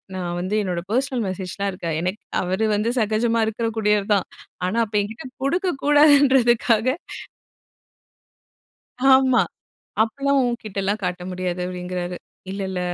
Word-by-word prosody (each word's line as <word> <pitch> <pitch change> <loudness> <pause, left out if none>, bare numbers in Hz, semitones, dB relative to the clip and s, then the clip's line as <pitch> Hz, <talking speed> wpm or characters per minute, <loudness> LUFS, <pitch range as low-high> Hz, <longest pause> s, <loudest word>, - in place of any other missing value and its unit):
நான் 175 -1 -3
வந்து 185 +4 -2
என்னோட 175 -2 -2
பெர்சனல் 255 -1 0
மெசேஜ் 185 0 -5
லாம் 200 0 0
இருக்கு. 175 -2 -5
எனக்கு 185 +4 -3 0.2
அவரு 190 +4 0
வந்து 210 +3 0
சகஜமா 225 +2 +1
இருக்க 225 +1 -2
கூடியவர் 210 -2 +2
தான். 195 - +1 0.4
ஆனா 215 +5 -2
அப்ப 210 - -18
என்கிட்ட 220 +5 -7 0.2
குடுக்க 360 +6 +1
கூடாதுன்றதுக்காக 270 -6 +5 2.3
ஆமா. 260 -1 +5 0.6
அப்புட்லாம் 275 +5 +1
உன்கிட்ட 225 -5 -4
எல்லாம் 205 +2 -1
காட்ட 180 0 -2
முடியாது 180 -1 -3
அப்பிடிங்கறாரு. 180 0 -4 0.3
"இல்ல, 195 - -4
இல்ல 185 -1 -3
210 Hz, 130 wpm, -22 LUFS, 185-240 Hz, 2.3 s, கூடாதுன்றதுக்காக